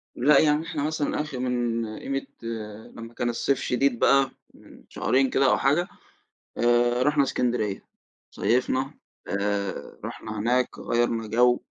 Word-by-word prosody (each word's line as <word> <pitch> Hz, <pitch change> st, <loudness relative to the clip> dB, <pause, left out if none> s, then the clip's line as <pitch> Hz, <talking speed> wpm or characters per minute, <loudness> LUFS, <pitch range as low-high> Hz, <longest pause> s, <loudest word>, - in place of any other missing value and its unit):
لا 140 Hz, +3 st, +5 dB
يعني 155 Hz, +1 st, +2 dB
إحنا 160 Hz, -4 st, -3 dB
مثلًا 150 Hz, -1 st, -1 dB
آخِر 140 Hz, -4 st, -6 dB
من 120 Hz, -2 st, -1 dB
قيمة 135 Hz, 0 st, -3 dB, 0.7 s
لمّا 115 Hz, +1 st, -9 dB
كان 120 Hz, 0 st, -1 dB
الصيف 130 Hz, +3 st, 0 dB
شديد 125 Hz, -1 st, +1 dB
بقى 135 Hz, -1 st, +4 dB, 0.2 s
من -, -, -17 dB
شهرين 135 Hz, 0 st, +1 dB
كده 135 Hz, -, +2 dB
أو -, -, +3 dB
حاجة، 150 Hz, +6 st, +2 dB, 0.7 s
آآ، 120 Hz, +1 st, +3 dB
رُحنا 150 Hz, +1 st, +3 dB
إسكندرية 120 Hz, -6 st, -1 dB, 0.5 s
صيفنا، 130 Hz, +3 st, 0 dB, 0.3 s
آآ 100 Hz, -1 st, -2 dB
رُحنا 110 Hz, -1 st, -6 dB
هناك، 125 Hz, +4 st, 0 dB
غيَّرنا 120 Hz, -1 st, 0 dB
جو، 120 Hz, +3 st, +3 dB
125 Hz, 135 wpm, -25 LUFS, 120-140 Hz, 0.7 s, لا